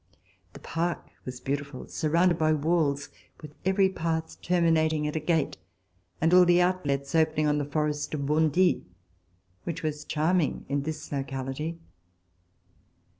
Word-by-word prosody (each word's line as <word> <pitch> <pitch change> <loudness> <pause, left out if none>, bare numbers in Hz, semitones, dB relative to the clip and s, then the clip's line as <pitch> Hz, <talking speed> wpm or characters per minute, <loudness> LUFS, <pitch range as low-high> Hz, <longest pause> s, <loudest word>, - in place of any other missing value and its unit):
The - - -11
park 170 +1 -2 0.2
was 130 -1 -6
beautiful, 140 0 -4
surrounded 170 +2 +2
by 155 0 +3
walls, 150 -2 +1 0.3
with 150 -1 -11
every 190 +1 +4
path 160 -3 -3
terminating 160 -3 +2
at 150 - -2
a - - +1
gate, 160 -1 0 0.6
and 165 +2 +2
all 180 0 +8
the 175 0 +5
outlets 145 -7 0
opening 155 -1 +2
on 150 0 +2
the 145 - -1
forest 150 0 -1
of 140 -2 -3
Bondy, 160 +4 +3 0.8
which 165 0 -5
was 150 -1 -2
charming 160 +1 0
in 140 +1 0
this 155 +2 -6
locality. 135 +3 -3
155 Hz, 135 wpm, -27 LUFS, 145-170 Hz, 0.8 s, all